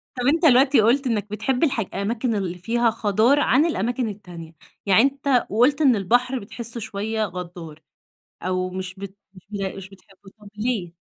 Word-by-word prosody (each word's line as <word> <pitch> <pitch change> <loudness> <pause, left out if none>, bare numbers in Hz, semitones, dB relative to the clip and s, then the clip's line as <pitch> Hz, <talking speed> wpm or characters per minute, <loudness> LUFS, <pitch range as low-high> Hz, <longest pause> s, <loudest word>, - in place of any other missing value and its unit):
طب 250 -1 -3
أنت 325 +4 +2
الوقتي 265 -2 +5
قُلت 255 +5 +2
إنّك 210 -3 -1
بتحب 245 +7 -1
الحاج 230 - 0
أماكن 220 +3 -1
اللي 180 -3 -3
فيها 230 +6 +1
خَضار 220 +6 +2
عن 285 +1 +3
الأماكن 245 - -1
التانية، 175 -5 -10 0.3
يعني 200 +2 +5
أنت 275 -1 +1
وقُلت 255 +8 +2
إن 260 -5 +5
البحر 245 +6 +1
بتحسّه 230 +2 -7
شوية 220 +1 -3
غدّار، 170 -4 -8 0.6
أو 185 0 -2
مش 185 0 -6
بت 195 0 -9 0.2
مش 185 - -15
بت 205 -1 -5
مش - - 0
بت - - -11
مش 190 -1 -9
بتحبه، 195 0 -18
طب 210 - -14
ليه؟ 210 -6 -2
220 Hz, 180 wpm, -23 LUFS, 190-250 Hz, 0.6 s, الوقتي